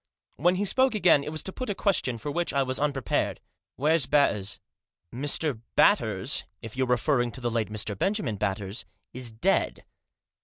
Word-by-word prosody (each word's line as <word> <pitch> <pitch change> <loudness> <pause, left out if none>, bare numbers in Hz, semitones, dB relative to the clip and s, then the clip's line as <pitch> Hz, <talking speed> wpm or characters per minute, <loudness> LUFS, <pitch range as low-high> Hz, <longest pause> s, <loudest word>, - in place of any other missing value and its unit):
When 175 +6 +3
he 200 +3 0
spoke 260 +4 +3
again 175 -8 +5
it 150 - -5
was 155 - -4
to 190 - -5
put 255 -3 -5
a 205 - -1
question 180 - 0
for 145 +6 -5
which 175 +3 -1
I 140 -1 +2
was 130 0 -2
unprepared. 140 -3 0 0.2
" - - -66
Where's 155 0 +2
Batters? 105 -9 +2 0.2
" - - -66
" 85 - -34
Mr. 140 -1 0
Batters - - +3
— 95 - -49
if 110 +1 -8
you 130 0 +1
are 125 0 +3
referring 120 -2 +1
to 130 - -6
the 120 -1 -1
late 115 -2 -1
Mr. 105 -1 -2
Benjamin 130 - -1
Batters 100 +3 -2
— - - -50
is 125 -1 -2
dead." 145 +13 0
135 Hz, 205 wpm, -27 LUFS, 115-165 Hz, 0.2 s, again